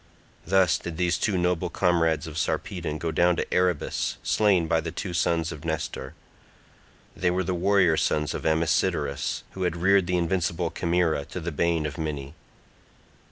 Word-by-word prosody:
Thus 95 -1 +3
did 85 -2 -6
these 85 -1 +1
two 100 -4 +1
noble 90 0 0
comrades 85 -2 +1
of 80 -2 -8
Sarpedon 80 -1 -2
go 80 +1 -2
down 85 +2 +3
to - - -3
Erebus 90 -4 0
slain 100 -6 +3
by 80 0 +2
the 85 - -4
two 90 +2 -5
sons 85 -1 +1
of 75 -3 -9
Nestor; 80 -4 -4 1.0
they 90 - +1
were 90 +1 0
the 90 - -2
warrior 90 -2 +3
sons 75 -1 0
of - - -5
Amisodorus, 80 -2 0
who 95 - -8
had 90 -2 0
reared 95 +1 +3
the 90 -1 +1
invincible 85 -1 0
Chimaera, 85 -3 0
to 90 - -6
the 85 0 -4
bane 80 +1 0
of 75 +1 -5
many. 75 -3 -4
85 Hz, 165 wpm, -26 LUFS, 80-90 Hz, 1.0 s, Thus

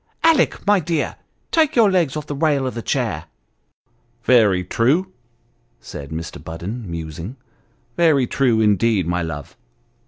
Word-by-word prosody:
Alick, 325 -4 +3
my 205 -1 +4
dear, 165 -2 -2 0.4
take 315 -3 +2
your 225 -5 +5
legs 165 -6 +1
off 150 - -5
the 145 - -5
rail 145 -2 +1
of 130 - -3
the 115 - -5
chair! - - -2 0.3
" 60 - -48
" 120 -1 -41
Very 105 -8 +4
true," 140 - +1 0.7
said 70 +3 -9
Mr. 80 -1 -6
Budden, 90 +7 -6
musing, 85 - -6 0.3
" 120 0 -40
very 155 -6 +4
true, 120 -3 +1
indeed, 105 -2 +2
my 90 +1 -1
love! 75 -4 -6
120 Hz, 155 wpm, -20 LUFS, -, 0.7 s, your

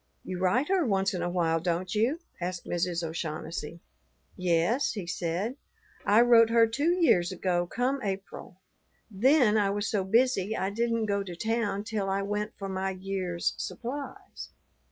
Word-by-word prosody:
"You 185 -1 -5
write 215 +10 +2
her 380 -2 +3
once 195 -5 +1
in 180 - -2
a 175 - -1
while, 165 -2 +1
don't 175 +2 -2
you?" 245 +10 +1 0.2
asked 180 0 -4
Mrs. 175 0 -1
O'Shaughnessy. 160 0 -5 0.5
"Yes," 180 +9 +1
he 200 -6 -5
said, 180 - -2 0.5
"I 210 +3 +5
wrote 235 -2 +6
her 230 0 +5
two 285 +9 0
years 200 - +3
ago 175 -1 0
come 255 +7 -1
April; 195 -3 -6 0.5
then 230 +1 +4
I 200 -1 +2
was 205 +1 -1
so 205 -3 0
busy 220 0 +2
I 190 +1 -1
didn't 230 +1 0
go 200 -1 0
to 180 -3 -6
town 220 0 -1
till 215 -3 -2
I 195 +1 0
went 210 +1 -3
for 195 - -5
my 190 0 -2
year's 185 -2 -2
supplies. 275 +4 -6
195 Hz, 160 wpm, -28 LUFS, 180-230 Hz, 0.5 s, wrote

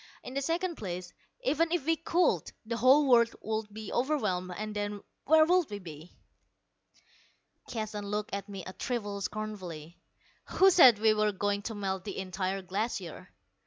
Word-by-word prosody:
In 255 - -8
the 275 - -1
second 335 +4 -1
place, 180 -3 -6 0.3
even 330 - +1
if 345 -6 0
we 325 +1 +3
could, 335 +2 +1
the 230 +1 -3
whole 265 +5 +5
world 235 -2 +5
would 220 -1 -3
be 215 0 -7
overwhelmed, 210 -10 0
and 215 0 -5
then 205 0 -3 0.2
where 315 +1 +6
would 355 -1 +3
we 205 - -5
be?" 165 -3 -11 1.6
Keston 215 -3 -4
looked 210 0 -3
at 200 +1 -4
me 195 -2 -7
a 185 - -7
trifle 205 -5 -3
scornfully. 185 -7 -6 0.5
"Who 385 +1 +5
said 260 - +8
we 220 +1 +4
were 215 0 +2
going 205 +1 -1
to 225 - -6
melt 190 -2 -3
the 205 - -6
entire 190 0 -3
glacier? 195 -2 -4
210 Hz, 165 wpm, -30 LUFS, 195-260 Hz, 1.6 s, said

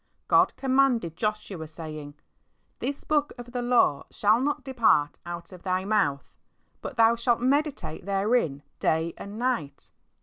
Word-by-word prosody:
God - - +4
commanded 260 - +2
Joshua 210 -5 -3
saying, 155 -2 -8 0.6
"This 280 +1 -3
book 295 -1 +1
of 240 0 -9
the 245 0 -2
law 240 - +2
shall 215 +2 +3
not 290 +2 -1
depart 230 - +2
out 170 -1 -7
of 180 -1 -11
thy 185 0 -1
mouth, 145 -10 +1 0.5
but 260 - -7
thou 230 0 +5
shalt 235 0 +1
meditate 275 - -1
therein 195 - +1 0.2
day 160 +1 +1
and 200 +2 -8
night." 225 - -2
215 Hz, 140 wpm, -27 LUFS, 165-250 Hz, 0.6 s, thou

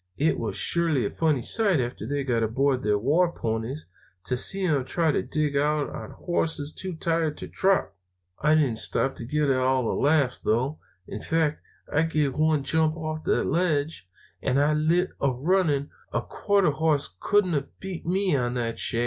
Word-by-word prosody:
It 155 +3 +1
was - - -3
surely 160 -8 +1
a - - -2
funny 155 -7 0
sight, 200 - +3
after 120 -3 -3
they 140 +1 -1
got 120 -4 0
aboard 130 +4 +1
their 105 0 +1
war 155 - +2
ponies, 115 +3 -4 0.4
to 125 - -1
see 190 +9 +1
them 145 -6 +1
trying 160 +4 0
to - - +1
dig 150 -2 -1
out 150 +1 +1
on - - -7
horses 160 -4 -2
too 185 -2 -5
tired 160 -1 0
to - - -6
trot. 190 - +1 0.5
"I 150 +1 +4
didn't 135 -8 +2
stop 135 +4 0
to 120 - -7
get 150 +2 +1
all 130 0 +2
the - - 0
laughs, 145 -4 +2
though. 130 +7 0 0.3
In 105 - -6
fact, 160 -2 0 0.3
I 150 - +3
give 155 -4 0
one 155 -2 +2
jump 160 +2 +1
off 155 -1 -4
that - - +2
ledge, 155 - -1 0.3
and 135 +1 +1
I 145 +1 +3
lit 165 +4 +1
a 140 - +3
running. 145 +1 +1 0.2
A - - 0
quarter 200 -6 +1
hoss 150 - 0
couldn't 205 -4 +2
have 140 -2 -4
beat 190 -3 -6
me 190 +2 0
to 125 -4 +1
that 115 -2 -2
shack. 115 - +1
150 Hz, 185 wpm, -26 LUFS, 130-165 Hz, 0.5 s, I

